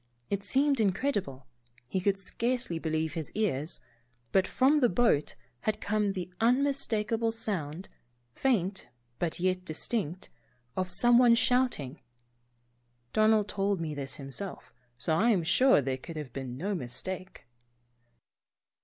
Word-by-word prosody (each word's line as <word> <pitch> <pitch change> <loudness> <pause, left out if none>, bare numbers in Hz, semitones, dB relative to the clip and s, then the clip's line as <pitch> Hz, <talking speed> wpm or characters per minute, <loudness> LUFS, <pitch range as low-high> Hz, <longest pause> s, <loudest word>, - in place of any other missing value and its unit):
It 200 0 -1
seemed 275 +3 +2
incredible 195 - -1 0.2
— 120 0 -33
he 190 - +1
could 195 +1 +1
scarcely 230 -1 -2
believe 160 -1 -1
his 160 -3 -4
ears, 165 -8 -1 0.5
but 190 -1 +3
from 280 +4 +3
that 245 -9 +2
boat 200 -11 +2 0.2
had 215 - -1
come 210 -1 0
the 180 -1 -6
unmistakable 230 -3 +1
sound, 185 -7 -4 0.5
faint 195 - 0 0.3
but 170 -1 -1
yet 185 0 0
distinct, 180 +1 -3 0.4
of 185 -1 -1
someone 240 +2 +6
shouting. 235 - +1 1.1
(Don 215 0 +4
ald 215 -2 +3
told 200 -1 0
me 160 -2 -3
this 140 -2 -4
himself, 145 +8 -6 0.2
so 160 +5 0
I 220 +9 +3
am 195 -7 +3
sure 255 - +5
there 130 0 -1
could 165 +5 -9
have 150 -6 -6
been 130 -2 -5
no 195 +8 -2
mistake.) 185 +6 -4
190 Hz, 135 wpm, -29 LUFS, 160-225 Hz, 1.1 s, someone